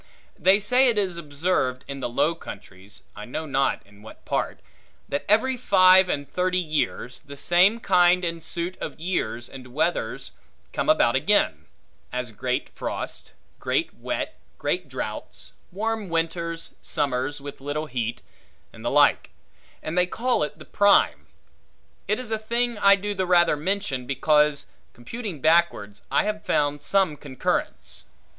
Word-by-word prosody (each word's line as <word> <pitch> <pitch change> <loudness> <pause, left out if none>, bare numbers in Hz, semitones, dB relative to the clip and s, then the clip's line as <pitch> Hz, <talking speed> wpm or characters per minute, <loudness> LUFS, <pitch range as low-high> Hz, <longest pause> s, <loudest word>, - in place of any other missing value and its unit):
They 190 +4 +4
say 250 +6 +3
it 235 -3 +2
is 190 -4 0
observed 145 -4 -1
in 140 0 -6
the 125 - -3
Low 150 +7 +2
Countries 100 - -10
(I 105 - -7
know 155 +7 -5
not 135 -2 0
in 100 +1 -19
what 110 - -14
part) - - -2 0.5
that 140 - -2
every 240 +5 +3
five 185 -4 +6
and 145 -3 -2
thirty 180 +5 0
years, 155 -7 -2
the 140 -1 -12
same 185 +9 +4
kind 180 -3 +4
and 165 -1 -3
suit 170 +3 -3
of - - -6
years 125 -9 -2
and 125 -1 -12
weathers 165 +3 -1 0.4
come - - -1
about 130 - +4
again; 130 - +2 0.4
as 125 -2 -3
great 125 +3 -2
frosts, - - -5 0.3
great - - -1
wet, - - -4 0.2
great - - -2
droughts, - - -6 0.2
warm 215 +1 -2
winters, 165 0 -2
summers 140 +1 -1
with 140 -1 -9
little 145 +2 -3
heat, 120 -5 -3 0.5
and - - -12
the - - 0
like; - - +4 0.5
and 155 - -4
they 180 0 +3
call 245 +6 0
it 150 - -2
the - - -12
Prime. 205 -1 +3 0.8
It 210 - +1
is 250 -3 -5
a 220 - 0
thing 235 +2 -1
I 200 0 +7
do 205 +1 -3
the 190 -2 -2
rather 175 -3 +4
mention, 150 -6 -2
because, 150 +2 +2 0.3
computing 180 - -7
backwards, 155 -11 +2
I - - +3
have 210 0 -3
found 145 0 0
some 190 -6 +2
concurrence. 140 -3 -3
165 Hz, 150 wpm, -25 LUFS, 135-195 Hz, 0.8 s, I